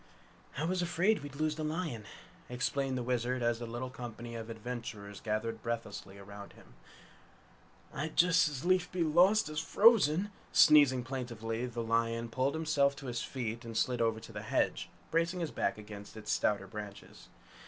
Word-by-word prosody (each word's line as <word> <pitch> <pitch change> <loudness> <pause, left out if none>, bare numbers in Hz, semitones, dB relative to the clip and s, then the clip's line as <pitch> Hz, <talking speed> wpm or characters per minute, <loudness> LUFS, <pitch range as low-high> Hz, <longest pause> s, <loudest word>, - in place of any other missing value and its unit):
"I 150 - -1
was 180 +2 0
afraid 175 +3 +2
we'd 145 -1 -8
lose 155 +1 -1
the 155 - -3
lion," 155 -8 -3 0.4
explained 130 +1 -1
the 125 - -2
Wizard 125 0 -1
as 120 -1 +1
the 120 - -5
little 120 +2 -5
company 120 -1 -7
of 115 -1 -6
adventurers 110 -3 -6
gathered 110 +1 -2
breathlessly 110 -4 -5
round 100 0 -10
him. - - -18 1.2
"I'd 155 +3 -4
just 165 -3 +5
as 145 +1 -6
lief 180 -1 +2
be 180 -2 0
lost 180 +6 +4
as 155 0 -3
frozen!" 200 0 +4 0.2
Sneezing 140 -4 +6
plaintively, 120 -2 -4
the 120 -1 -4
lion 115 +1 0
pulled 130 +5 0
himself 150 -3 +2
to 140 - -10
his 120 -2 -3
feet 115 -3 -4
and 115 -1 -5
slid 125 0 +1
over 115 -1 +1
to - - -11
the - - -6
hedge, - - 0 0.2
bracing 170 +2 +1
his 165 -3 -2
back - - -1
against 105 0 -10
its 105 - -4
stouter 100 -2 +1
branches. 100 0 -9
125 Hz, 170 wpm, -32 LUFS, 115-155 Hz, 1.2 s, Sneezing